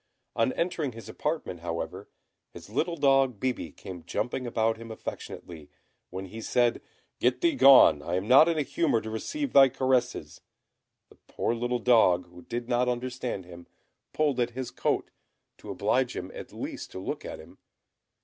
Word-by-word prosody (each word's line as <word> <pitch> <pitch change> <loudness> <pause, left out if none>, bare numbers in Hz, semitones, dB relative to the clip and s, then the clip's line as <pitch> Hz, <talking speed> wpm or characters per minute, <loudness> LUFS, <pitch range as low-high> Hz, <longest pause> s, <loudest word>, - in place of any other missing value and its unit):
On 115 +3 +2
entering 165 -6 -2
his 115 -2 -10
apartment, 150 - -3
however, 85 0 -5 0.4
his 85 +3 -13
little 165 +8 0
dog 135 -5 +3
Bibi 125 - -2
came 90 +1 -10
jumping 120 +8 -3
about 115 -1 0
him 115 0 -10
affectionately, 85 -7 -8 0.4
when 95 +1 -6
he 110 +4 -8
said, 120 +1 +1 0.4
"Get - - +1
thee 340 -2 +3
gone, 135 - +7
I 85 - -3
am 95 +3 -2
not 135 +7 +7
in 165 - 0
a 150 - +1
humour 140 -2 +1
to 110 - -6
receive 285 - -3
thy 135 -1 +8
caresses!" 125 - -1 0.7
The - - -20
poor - - -1
little 120 +1 -1
dog, 110 -7 +4
who 90 0 -13
did 120 +3 -5
not 125 0 +1
understand 125 -5 -3
him, 85 -1 -12 0.4
pulled 145 -4 0
at 120 - +1
his 130 -2 -4
coat, - - -1 0.5
to - - -11
oblige - - 0
him - - -5
at - - -9
least - - -6
to - - -6
look 95 - -5
at - - -6
him. - - -15
120 Hz, 170 wpm, -28 LUFS, 95-135 Hz, 0.7 s, thy